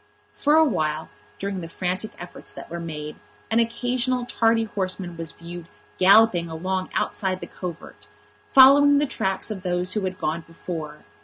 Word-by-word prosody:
For 295 +1 +2
a 320 0 +6
while, 155 - -1 0.3
during 195 -1 -4
the 165 - -6
frantic 185 +5 -3
efforts 175 0 -9
that - - -10
were 170 - -4
made, 150 -2 -6 0.3
an 225 - +3
occasional 245 +2 0
tardy 225 -1 +2
horseman 185 -4 -3
was 165 -1 -6
viewed 170 0 -10 0.3
galloping 190 -3 +5
along 185 +3 -3
outside 190 -2 -1
the - - -6
covert, 175 - -8 0.4
following 285 +2 +8
the 295 - +3
tracks 190 -5 -2
of 200 -3 -5
those 180 0 0
who 210 - 0
had 185 0 -3
gone 165 -1 -2
before. 165 -2 -8
185 Hz, 160 wpm, -24 LUFS, 170-225 Hz, 0.4 s, following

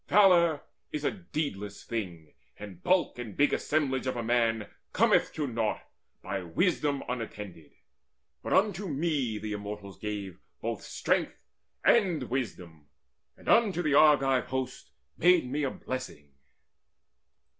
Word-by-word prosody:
Valour 175 -6 +5 0.3
is 150 - -4
a - - +2
deedless 145 - -5
thing; 85 -9 -5 0.2
And 100 -4 -10
bulk 180 -8 +2
and 115 -5 -7
big 145 0 +4
assemblage 135 -4 0
of 130 - -1
a 120 - -3
man 115 -2 +1 0.3
Cometh - - +3
to 150 - -2
naught, 115 -4 -1 0.4
by 100 - -3
wisdom 145 - 0
unattended. 105 -9 -6 0.7
But - - -2
unto 200 0 +2
me 140 -7 -1
the 105 0 -4
Immortals 105 -1 -7
gave 100 -4 -5 0.2
both - - -3
strength - - -1 0.5
And 175 - +3
wisdom, 90 - -4 0.5
and - - -17
unto 200 -7 +4
the 150 -3 +1
Argive 140 -4 +5
host 130 0 -4 0.3
Made 180 -3 +5
me 145 +4 -2
a 140 - +1
blessing. 130 - -7
130 Hz, 130 wpm, -29 LUFS, 105-155 Hz, 0.7 s, Valour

